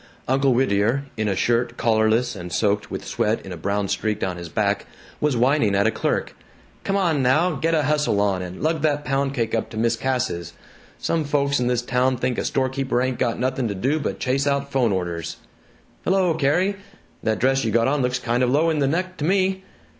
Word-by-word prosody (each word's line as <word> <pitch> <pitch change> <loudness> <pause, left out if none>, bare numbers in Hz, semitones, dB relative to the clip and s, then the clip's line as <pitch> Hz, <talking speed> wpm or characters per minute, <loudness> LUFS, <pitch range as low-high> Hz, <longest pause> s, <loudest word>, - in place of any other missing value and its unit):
Uncle 135 +1 +3
Whittier, 120 +1 +2
in 110 -1 -1
a 100 - 0
shirt 120 +3 0
collarless 110 +2 +2
and 90 -2 -7
soaked 105 +3 0
with - - -5
sweat 110 +2 0
in 95 - -8
a - - -4
brown 100 +4 -1
streak 110 +2 -1
down 95 -1 -2
his 85 -1 -7
back, - - 0 0.3
was 150 -4 +1
whining 125 -4 +3
at 100 +1 +3
a 115 - +3
clerk, - - -2 0.5
"Come 195 - 0
on 165 -7 +1
now, 150 +8 +3
get 165 +2 0
a 155 - +2
hustle 150 -7 +1
on 100 -2 +1
and 90 +6 -7
lug 160 0 +1
that 150 -1 0
pound 135 +1 0
cake 115 -3 -1
up 115 - -1
to 110 - -8
Mis' 115 +1 +2
Cass's. 125 - -2 0.4
Some 165 -1 -1
folks 140 -1 +1
in 125 - 0
this 125 -1 0
town 125 +1 +1
think 125 0 -1
a - - -2
storekeeper 130 -1 0
ain't 130 0 -1
got 115 - 0
nothing 130 0 -1
to 100 - -3
do 135 +11 0
but 145 - -3
chase 135 +2 0
out 140 0 0
'phone 125 -5 +2
orders.... 85 -3 -3 0.7
Hello, 185 -2 +2
Carrie. 175 +7 +1 0.4
That 110 -1 0
dress 135 +2 +2
you 115 - 0
got 115 +2 +2
on 145 +1 +1
looks 125 0 0
kind 120 0 -1
of 125 - +3
low 155 +5 +3
in 155 - 0
the 140 - +2
neck 185 +5 -2
to - - -4
me. 190 +2 +1
130 Hz, 215 wpm, -23 LUFS, 110-145 Hz, 0.7 s, Uncle